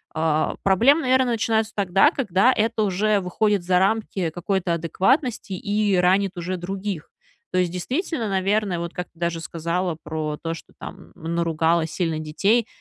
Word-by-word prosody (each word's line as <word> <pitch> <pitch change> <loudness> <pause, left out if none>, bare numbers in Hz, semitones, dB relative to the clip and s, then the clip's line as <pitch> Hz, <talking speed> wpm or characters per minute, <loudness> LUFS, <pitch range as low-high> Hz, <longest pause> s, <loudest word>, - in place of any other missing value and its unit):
Э, 155 -1 +1
проблемы, 235 - +4
наверно, 260 -1 +3
начинаются 220 -1 0
тогда, 195 -2 +4
когда 215 -1 +2
это 225 0 0
уже 205 +1 +1
выходит 200 +2 0
за 180 0 +3
рамки 195 -3 0
какой-то 175 +1 -1
адекватности, 205 - 0
и 205 +1 0
ранит 190 +2 +2
уже 180 +2 -3
других. 190 -1 -5 0.4
То 185 - +2
есть, 180 -2 +1
действительно, 250 - -2
наверно, 195 -1 0
вот, 170 0 -5
как 180 - -5
ты 165 - -25
даже 170 -1 -1
сказала 170 +2 -2
про 155 -1 -3
то, 165 0 -2
что, - - -14
там, 185 +1 -10
наругала 165 0 0
сильно 165 -1 -2
детей, 200 +9 +1
185 Hz, 155 wpm, -23 LUFS, 170-215 Hz, 0.4 s, проблемы